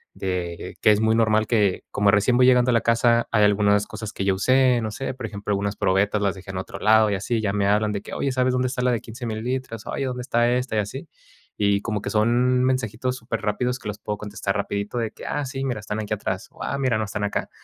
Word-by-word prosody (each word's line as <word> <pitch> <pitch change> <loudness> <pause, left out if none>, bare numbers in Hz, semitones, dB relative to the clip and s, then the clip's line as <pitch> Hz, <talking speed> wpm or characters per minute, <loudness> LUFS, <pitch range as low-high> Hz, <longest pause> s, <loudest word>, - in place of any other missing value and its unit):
de 90 -3 -4
que 110 - +6
es 105 0 +2
muy 110 0 +3
normal 110 -1 +2
que, 105 -5 +1
como 100 0 +3
recién 105 +5 +3
voy 125 - +6
llegando 125 -1 +5
a - - +2
la 115 - +3
casa, 115 0 +3
hay 110 -2 +3
algunas 105 0 +3
cosas 110 -1 -7
que 95 - -3
yo 95 -1 +2
usé, 130 +4 +3
no 110 - -3
sé, 135 +5 -4
por 130 -2 -6
ejemplo, 105 -1 -5
algunas 100 0 -1
probetas 100 +3 +1
las 100 -1 0
dejé 95 0 -9
en 95 - -5
otro 95 - -7
lado 110 0 +5
y 100 - 0
así, 110 +4 -1
ya 105 -2 0
me 100 -1 +1
hablan 105 +1 +2
de 100 -1 -3
que: - - -9
"Oye, 135 - -1
¿sabes 130 0 +1
dónde 125 0 +1
está 125 0 -3
la 125 - +3
de 115 -3 -1
15 120 +2 -8
mililitros?, 115 0 -4
oye, 135 - -2
¿dónde 125 -1 -3
está 120 -1 +1
esta?", 125 -2 -1
y - - +2
así, 105 +7 -5 0.5
y 100 -1 +2
como 105 -1 -2
que - - -4
son 120 +4 +2
mensajitos 130 -1 -1
superrápidos 115 +2 -2
que 110 - -9
los 105 - -4
puedo 105 0 -4
contestar 100 -1 -3
rapidito 100 +3 -2
de 115 -2 -1
que: - - -12
"Ah, 145 -1 -2
sí, 135 +1 -4
mira, 125 -5 -2
están 105 0 -4
aquí 105 0 -3
atrás, 95 -2 -3
o, - - -15
ah, - - -2
mira 130 -5 +1
no, 110 - -1
están 105 0 -4
acá". 100 - -2
110 Hz, 260 wpm, -23 LUFS, 105-125 Hz, 0.5 s, que